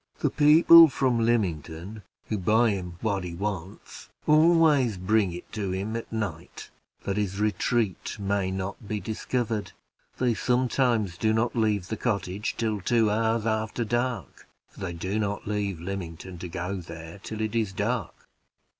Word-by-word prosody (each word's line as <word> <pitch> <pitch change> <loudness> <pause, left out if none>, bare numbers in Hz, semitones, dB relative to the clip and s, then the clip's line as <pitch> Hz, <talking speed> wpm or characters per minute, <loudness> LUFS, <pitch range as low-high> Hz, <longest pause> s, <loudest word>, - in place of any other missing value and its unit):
The - - 0
people 160 +2 +8
from 130 -3 +1
Lymington, 95 -3 -1 0.2
who 105 - -2
buy 110 +4 +3
him 90 -3 -5
what 100 -4 -1
he 85 -1 -6
wants, 100 -1 -6 0.2
always 155 - +4
bring 100 +1 +2
it 85 - -9
to 105 -3 -3
him 100 +4 -3
at 115 - -5
night, 100 -8 -5 0.3
that 100 0 -2
his 100 -1 -2
retreat 105 -1 0
may 100 -1 -1
not 95 +3 -5
be 105 +1 -2
discovered. 110 -1 -3 0.4
They 125 -2 +2
sometimes 120 -6 +1
do 110 -1 +2
not 115 +3 0
leave 105 -5 0
the 110 - -3
cottage 100 -2 -2
till 110 -3 -1
two 115 +1 +2
hours 110 +1 +1
after 110 +1 -1
dark, 120 +2 -3 0.2
for - - -17
they 90 -3 -4
do 95 +5 -2
not 100 -1 -2
leave 100 -4 -2
Lymington 90 -1 -6
to 90 - -5
go 90 +2 -3
there 85 +1 -9
till 110 +2 -7
it 110 0 -2
is 110 -4 0
dark." 95 - -3
105 Hz, 155 wpm, -26 LUFS, 95-115 Hz, 0.4 s, people